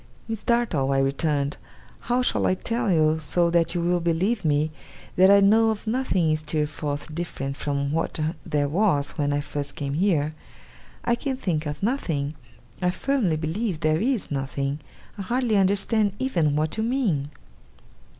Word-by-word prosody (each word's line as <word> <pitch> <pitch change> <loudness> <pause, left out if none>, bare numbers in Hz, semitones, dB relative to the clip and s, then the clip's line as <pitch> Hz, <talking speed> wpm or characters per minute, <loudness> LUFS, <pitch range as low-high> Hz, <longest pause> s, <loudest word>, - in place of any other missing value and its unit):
'Miss 225 -2 -4
Dartle,' 200 - +1
I - - +2
returned, 140 +1 0 0.4
'how 245 +1 0
shall - - +1
I 185 - +2
tell 230 +2 -1
you, 155 -1 +3
so 170 +3 +1
that 170 0 +2
you 175 - 0
will 175 +1 +1
believe 175 +6 0
me, 150 0 +1 0.4
that 190 +1 +6
I 200 0 +7
know 220 +3 +5
of 220 0 -3
nothing 215 -9 +1
in 155 - +2
Steerforth 150 -1 -3
different 140 -5 -4
from 140 -1 -2
what 165 +1 -2 0.2
there 145 -1 0
was 150 -4 +1
when 145 0 +1
I 145 0 0
first 145 -1 -5
came 140 -1 -3
here? 155 -3 +1 0.7
I 235 - +3
can 260 +2 -2
think 160 - -1
of 150 +2 -5
nothing. 160 - -1 0.5
I 180 - +2
firmly 215 - 0
believe 170 +3 -2
there 155 +1 +2
is 240 - -1
nothing. 140 +1 -2 0.4
I - - -2
hardly 235 +2 0
understand 200 +2 +2
even 170 - +1
what 155 +5 -1
you 220 - 0
mean. 220 - 0
165 Hz, 165 wpm, -25 LUFS, 145-215 Hz, 0.7 s, I